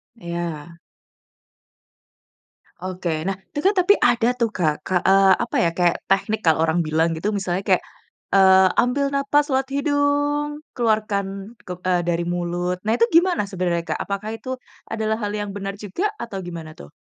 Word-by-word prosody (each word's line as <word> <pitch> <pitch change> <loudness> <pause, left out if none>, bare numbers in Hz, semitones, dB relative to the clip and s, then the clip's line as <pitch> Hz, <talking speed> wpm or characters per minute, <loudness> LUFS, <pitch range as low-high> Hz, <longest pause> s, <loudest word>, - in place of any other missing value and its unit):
Ya. 170 -3 -6 2.0
Oke. 185 -1 -4 0.2
Nah 195 - 0 0.2
tu 290 - -2
kan 400 - +5
tapi 365 +3 +5
ada 240 -1 +2
tuh, 230 -1 +2
Kak, 155 -4 +1 0.3
eee, 195 0 +6
apa - - -5
ya, 170 - +3
kayak 175 -1 +3
teknik 210 +3 +1
kalau 160 0 +4
orang 165 +2 +1
bilang 160 +2 +2
gitu 165 +6 -3
misalnya 190 0 -2
kayak, - - +3 0.5
eee, 190 -1 +7
ambil 275 +3 +2
nafas 285 +1 +2
lewat 265 0 +1
hidung, 290 +1 0
keluarkan 215 -4 +1 0.4
ke 180 - -4
eee, 180 -1 +2
dari 170 0 0
mulut, 175 +1 -2
nah 220 - +3
itu 230 - +2
gimana 345 - +4
sebenarnya, 175 -2 -1
Kak? - - -1
Apakah 200 +2 -4
itu 255 - -10 0.4
adalah 220 0 -1
hal 205 - -1
yang 205 -1 -3
benar 195 0 -4
juga? 210 - -3 0.2
Atau 200 -5 -6
gimana 165 -2 -7
tuh? 70 - -11
195 Hz, 160 wpm, -22 LUFS, 175-245 Hz, 2.0 s, eee